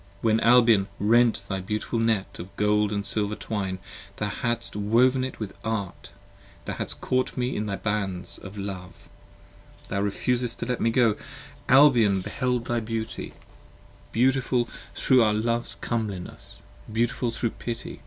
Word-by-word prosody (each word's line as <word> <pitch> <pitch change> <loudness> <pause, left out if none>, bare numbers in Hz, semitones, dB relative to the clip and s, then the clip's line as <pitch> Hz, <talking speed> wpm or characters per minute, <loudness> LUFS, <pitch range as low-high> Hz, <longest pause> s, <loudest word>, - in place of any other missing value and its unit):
30 - - -3
When 110 0 +4
Albion 115 -4 +5
rent 115 +2 +3
thy 95 -1 -2
beautiful 105 +4 -2
net 110 -4 0
of 90 +3 -9
gold 105 0 +2
and 100 -1 -2
silver 105 0 0
twine, 100 -4 -3 0.4
Thou 105 0 -2
hadst 120 +2 -1
woven 120 +6 +3
it 130 - -5
with 105 -3 -5
art, 105 -5 -4 0.6
thou - - -3
hadst - - -3
caught 130 +1 0
me 125 +1 -1
in 105 - -2
the 100 -1 -2
bands 95 -3 -2
Of 100 +2 -10
love: 95 -3 -7 0.8
thou 100 - -1
refusedst 120 +4 -1
to - - -4
let 125 0 -2
me 115 - +3
go: 115 -2 +3 0.5
Albion 120 -8 +6
beheld 125 +4 -1
thy 120 0 0
beauty, 115 0 -4 0.8
21 - - -28
Beautiful 125 0 +2 0.3
thro' 130 -1 +4
our 105 -1 +2
Love's 115 -1 0
comeliness, 100 -4 -5 0.3
beautiful 120 +2 0
thro' 115 0 -2
pity. 115 -1 -6
110 Hz, 155 wpm, -26 LUFS, 100-120 Hz, 0.8 s, Albion